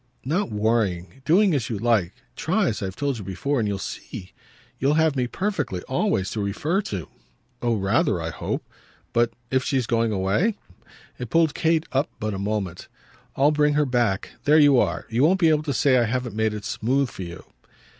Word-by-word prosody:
"Not 170 +10 0
worrying. 105 0 -1
Doing 185 +4 +4
as 135 -7 -1
you 110 - -2
like. 105 -5 +2 0.2
Try, - - +1
as - - -4
I've 95 -1 -4
told 140 -2 -2
you - - -6
before, 100 - -2
and 110 - 0
you'll 100 -1 -1
see. 95 -1 -7 0.5
You'll 140 +3 +2
have 160 -2 +3
me 125 -2 0
perfectly, 150 - -2
always, 130 - 0
to 110 - -2
refer 150 - 0
to." 95 -5 -4 0.5
"Oh 120 -1 +1
rather, 95 -2 +1
I - - -3
hope! - - -4 0.5
But 120 0 +3 0.2
if 130 0 +2
she's 130 -3 0
going 115 -1 +1
away?" 105 - +1 0.6
It 125 -2 -5
pulled 165 0 +3
Kate 160 0 +1
up 135 +3 +1
but 110 -1 -2
a 95 - -4
moment. 100 -4 -3 0.5
"I'll 140 +2 +4
bring 150 -1 +2
her 150 0 +3
back. 120 -7 0 0.2
There 150 +2 +6
you 145 -4 +6
are. - - 0
You 115 +2 0
won't 185 +5 +4
be 165 -3 +5
able 155 -1 +3
to 155 -2 -3
say 135 +1 +3
I 120 - +3
haven't 120 -1 -2
made 110 -1 0
it 105 - -7
smooth 130 +3 0
for - - -9
you." 85 -1 -7
120 Hz, 195 wpm, -24 LUFS, 105-150 Hz, 0.6 s, There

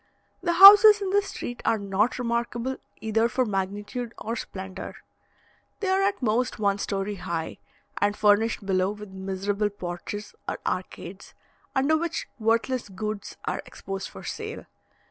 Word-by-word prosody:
The 345 -1 +1
houses 415 +3 +10
in 390 -2 -2
this 405 0 +2
street 245 - -6
are 225 - +2
not 200 +3 0
remarkable 235 +1 -2 0.2
either 225 +1 +1
for 255 +1 +1
magnitude 205 +4 -3
or 230 +2 -4
splendour; 190 -4 -7 0.8
they 395 - -1
are 380 +1 +3
at 390 -7 0
most 245 +3 +1
one 200 -1 +1
story 200 +1 -2
high, 170 -3 -4 0.4
and 205 0 +2
are - - -18
furnished 210 0 +3
below 185 -1 +1
with 210 0 -8
miserable 195 +2 -2
porches 205 +2 -6 0.2
or - - -3
arcades, 185 +1 -5 0.4
under 275 +4 +3
which 335 +1 -2
worthless 230 +1 0
goods 210 +1 -5
are - - -2
exposed 195 0 -6
for - - -11
sale. - - -6
215 Hz, 145 wpm, -26 LUFS, 195-250 Hz, 0.8 s, houses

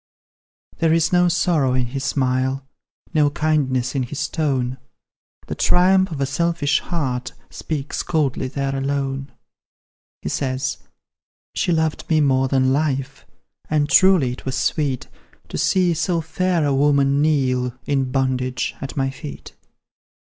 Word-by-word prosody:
There 165 -1 +2
is 165 +1 +2
no 180 0 +5
sorrow 160 -7 +2
in 130 -1 +1
his 135 +3 -5
smile, 130 -1 0 0.5
No 150 -2 +4
kindness 140 -5 0
in 135 - 0
his 135 +4 -3
tone; 130 -5 -1 0.7
The - - -5
triumph 190 +1 +3
of 155 -4 -5
a 135 - +1
selfish 165 0 +1
heart 130 -7 -3 0.2
Speaks 150 -3 -4
coldly 145 -5 0
there 135 0 -2
alone; 135 0 -2 0.9
He 75 - -2
says: 130 - -2 0.7
"She - - 0
loved 160 -2 -1
me 160 -1 +3
more 135 -2 +3
than 130 0 +2
life; 135 -2 -2 0.4
And 150 -1 +2
truly 165 -4 +5
it 125 - -8
was 130 - -3
sweet 140 -5 -1 0.4
To - - -4
see 180 -2 +2
so 165 +2 0
fair 165 +1 0
a 140 - +1
woman 140 0 +3
kneel, 130 -5 +1
In 135 -2 0
bondage, 130 -1 -1
at 135 +2 -6
my 135 -1 0
feet. 140 +2 -9
140 Hz, 140 wpm, -21 LUFS, 130-155 Hz, 0.9 s, no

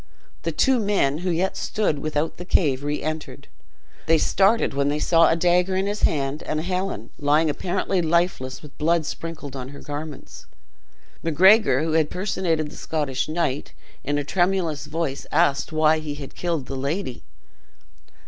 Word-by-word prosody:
The - - -2
two 265 -2 +3
men, 195 -9 +1
who 180 +1 -2
yet 180 +3 0
stood 200 -9 -1
without 155 +1 -2
the 180 - -6
cave, 145 -7 +1
re 145 +1 -2
entered. 155 0 -5 0.6
They 165 0 +5
started 200 +6 +2
when 140 +1 +1
they 145 - 0
saw 165 +2 +4
a - - +3
dagger 180 +2 +2
in 190 +1 +1
his 205 +1 -3
hand, 140 0 +1
and 155 - -2
Helen, 180 - -3
lying 150 +2 +3
apparently 185 +3 -1
lifeless, 165 -6 0
with 150 - -12
blood 165 +1 +2
sprinkled 155 -4 -6
on 130 -1 -6
her 140 - -10
garments. 145 -1 -8 0.7
Macgregor, 175 - +5
who 160 - -1
had 155 -1 +2
personated 175 -5 -1
the - - -11
Scottish 145 -5 -2
knight, 155 -4 -2 0.3
in 145 0 -1
a 145 - -1
tremulous 175 -3 0
voice 155 -4 -3
asked 140 +2 +2
why 155 0 +3
he 150 -2 -5
had 140 -2 -9
killed 170 -6 -2
the 135 - -6
lady? 140 +1 -3
155 Hz, 165 wpm, -23 LUFS, 145-180 Hz, 0.7 s, They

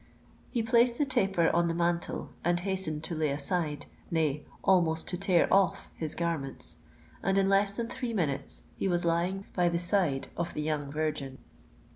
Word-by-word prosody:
He 235 -3 0
placed 235 +1 +4
the 295 - +2
taper 195 -10 +2
on 170 0 +3
the 165 - -1
mantel, 170 0 -1
and 175 0 +2
hastened 185 -5 -1
to 170 - -3
lay 155 -2 +1
aside—nay, 150 0 -2 0.2
almost 165 -4 +3
to - - 0
tear 180 -2 +3
off 195 0 +2
his 160 -2 -4
garments; 140 - -2 0.4
and 195 +1 +1
in 195 -1 +4
less 195 +1 +3
than 235 - -1
three 245 0 -4
minutes 160 -11 -2
he - - -1
was 175 -2 +1
lying 175 +4 0
by 175 -1 +3
the 170 - 0
side 175 -6 +1
of 170 0 -3
the 150 - -1
young 150 -2 -2
virgin. 150 -3 -2
170 Hz, 170 wpm, -30 LUFS, 155-195 Hz, 0.4 s, placed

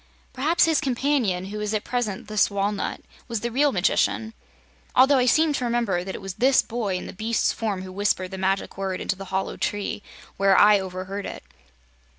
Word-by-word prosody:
Perhaps 310 +6 +3
his 320 -2 +2
companion, 250 -9 0
who 210 - -4
is 210 +1 -1
at 210 - -1
present 235 -6 -3
this 215 -1 +2
walnut, 200 0 -2 0.3
was 230 -3 -3
the 235 - -2
real 285 +4 +3
magician, 220 +3 +1 0.6
although 265 +2 +6
I 250 - +2
seem 310 +4 +4
to 255 - -2
remember 235 -7 0
that 190 +1 -6
it - - -8
was 195 -1 -5
this 265 +1 +5
boy 220 -5 -2
in 180 - -4
the - - -8
beast's 220 +3 0
form 205 -4 -3
who 185 - -8
whispered 185 -1 -1
the 190 - -6
Magic 190 +1 -1
Word 190 -1 -2
into - - -2
the 195 +1 -8
hollow 190 +1 -3
tree, 205 0 -2 0.4
where 195 -1 +4
I 205 0 +7
overheard 190 +1 -5
it." - - -8
210 Hz, 195 wpm, -24 LUFS, 190-245 Hz, 0.6 s, I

